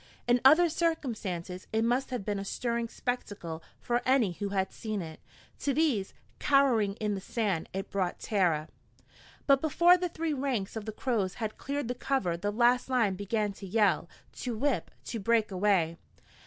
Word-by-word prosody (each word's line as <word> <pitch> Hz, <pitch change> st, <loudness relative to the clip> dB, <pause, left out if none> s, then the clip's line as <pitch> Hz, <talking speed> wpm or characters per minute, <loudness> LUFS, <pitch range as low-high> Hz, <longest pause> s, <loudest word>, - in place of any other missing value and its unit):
In 245 Hz, 0 st, +4 dB
other 315 Hz, +6 st, +7 dB
circumstances 225 Hz, -, -2 dB
it 220 Hz, 0 st, +1 dB
must 245 Hz, +3 st, +1 dB
have 245 Hz, -6 st, -4 dB
been 205 Hz, -2 st, -1 dB
a -, -, -4 dB
stirring 235 Hz, +3 st, -2 dB
spectacle 205 Hz, -11 st, -4 dB, 0.2 s
for 240 Hz, 0 st, 0 dB
any 255 Hz, -7 st, +3 dB
who 200 Hz, +3 st, -4 dB
had 190 Hz, -1 st, -1 dB
seen 215 Hz, -3 st, -4 dB
it. 160 Hz, -3 st, -7 dB, 0.4 s
To 280 Hz, -2 st, 0 dB
these, 275 Hz, -11 st, +1 dB, 0.2 s
cowering 245 Hz, -8 st, +3 dB
in 210 Hz, -1 st, -1 dB
the 195 Hz, -, -4 dB
sand, 200 Hz, -5 st, -1 dB
it 195 Hz, +1 st, -5 dB
brought 190 Hz, -3 st, -1 dB
terror. 175 Hz, -8 st, +1 dB, 0.8 s
But 275 Hz, -1 st, +5 dB
before 340 Hz, +3 st, +5 dB
the 360 Hz, 0 st, -1 dB
three 325 Hz, -1 st, -2 dB
ranks 260 Hz, -8 st, -2 dB
of 220 Hz, -2 st, -5 dB
the 220 Hz, -, -3 dB
Crows 210 Hz, -5 st, -1 dB
had 220 Hz, -2 st, -4 dB
cleared 285 Hz, -2 st, -3 dB
the 245 Hz, -, -1 dB
cover 245 Hz, -9 st, -1 dB
the 195 Hz, +5 st, -2 dB
last 240 Hz, +4 st, +3 dB
line 235 Hz, -6 st, +2 dB
began 205 Hz, +2 st, -1 dB
to 195 Hz, 0 st, -9 dB
yell, 200 Hz, -3 st, +2 dB, 0.3 s
to 240 Hz, -3 st, -3 dB
whip, 280 Hz, +2 st, 0 dB, 0.2 s
to 230 Hz, -, -4 dB
break 220 Hz, 0 st, +2 dB
away. 185 Hz, -4 st, +2 dB
220 Hz, 175 wpm, -30 LUFS, 195-255 Hz, 0.8 s, other